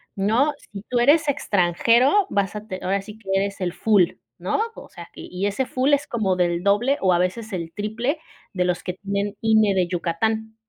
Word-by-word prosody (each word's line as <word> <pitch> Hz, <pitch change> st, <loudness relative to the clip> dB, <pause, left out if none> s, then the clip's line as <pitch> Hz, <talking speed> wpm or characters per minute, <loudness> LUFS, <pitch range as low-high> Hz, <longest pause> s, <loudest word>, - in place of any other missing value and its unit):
¿no? 225 Hz, +9 st, +2 dB
Si 200 Hz, -7 st, -11 dB
tú 245 Hz, -, +1 dB
eres 295 Hz, +5 st, +4 dB
extranjero, 240 Hz, -, +3 dB
vas 200 Hz, 0 st, -1 dB
a 210 Hz, +1 st, -7 dB
te 185 Hz, -3 st, -5 dB
ahora 195 Hz, +2 st, 0 dB
sí 210 Hz, +2 st, -11 dB
que 195 Hz, -, -13 dB
eres 200 Hz, 0 st, -1 dB
el 175 Hz, -1 st, -1 dB
full, 205 Hz, -6 st, +3 dB, 0.3 s
¿no?, -, -, -1 dB, 0.2 s
o -, -, -11 dB
sea, -, -, -11 dB
y -, -, -9 dB
y 185 Hz, +2 st, -2 dB
ese 205 Hz, +6 st, -1 dB
full 260 Hz, +3 st, +1 dB
es 285 Hz, +1 st, +2 dB
como 205 Hz, -6 st, 0 dB
del 175 Hz, -1 st, 0 dB
doble 240 Hz, +8 st, +2 dB
o 185 Hz, -2 st, +3 dB
a 175 Hz, -, +2 dB
veces 215 Hz, +4 st, -2 dB
el 170 Hz, -3 st, -4 dB
triple 230 Hz, +9 st, -2 dB, 0.3 s
de 180 Hz, -2 st, 0 dB
los 180 Hz, -1 st, -1 dB
que 180 Hz, -, -3 dB
tienen 200 Hz, +2 st, -3 dB
INE 220 Hz, -2 st, +4 dB
de 180 Hz, -2 st, +2 dB
Yucatán. 220 Hz, +6 st, -2 dB
205 Hz, 210 wpm, -23 LUFS, 185-235 Hz, 0.3 s, eres